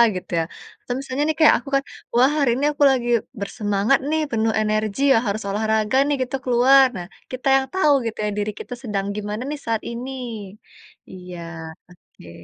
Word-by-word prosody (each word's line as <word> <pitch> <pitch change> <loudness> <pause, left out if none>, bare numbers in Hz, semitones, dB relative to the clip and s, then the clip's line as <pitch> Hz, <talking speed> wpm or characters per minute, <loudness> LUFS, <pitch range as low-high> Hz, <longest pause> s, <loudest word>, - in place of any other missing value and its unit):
gitu 180 - -7
ya, - - +1 0.4
atau 245 - -3
misalnya 275 +1 -2
nih 310 - 0
kayak 310 - +7
aku 275 +3 -10
kan, 275 - +2 0.3
"Wah 255 +3 +5
hari 275 -4 +3
ini 285 +3 0
aku 290 0 0
lagi 245 -2 0 0.3
bersemangat 205 +4 +1
nih 315 0 +1
penuh 225 -1 +1
energi 215 +3 -1
ya, - - +4
harus 210 +2 -1
olahraga 220 +3 +1
nih 290 - +1
gitu, 255 +2 -4
keluar." 260 +2 +6
Nah, 175 - -5 0.3
kita 255 +1 -4
yang 265 - 0
tahu 305 -6 +4
gitu 225 - -4
ya, - - 0
diri 210 +1 -1
kita 245 - -7
sedang 200 -4 -2
gimana 210 +2 -4
nih 300 -1 -4
saat 225 -1 -1
ini. 250 +3 -6 1.0
Iya, 180 -2 -9 0.5
oke. 175 - -17
230 Hz, 185 wpm, -22 LUFS, 210-270 Hz, 1.0 s, kayak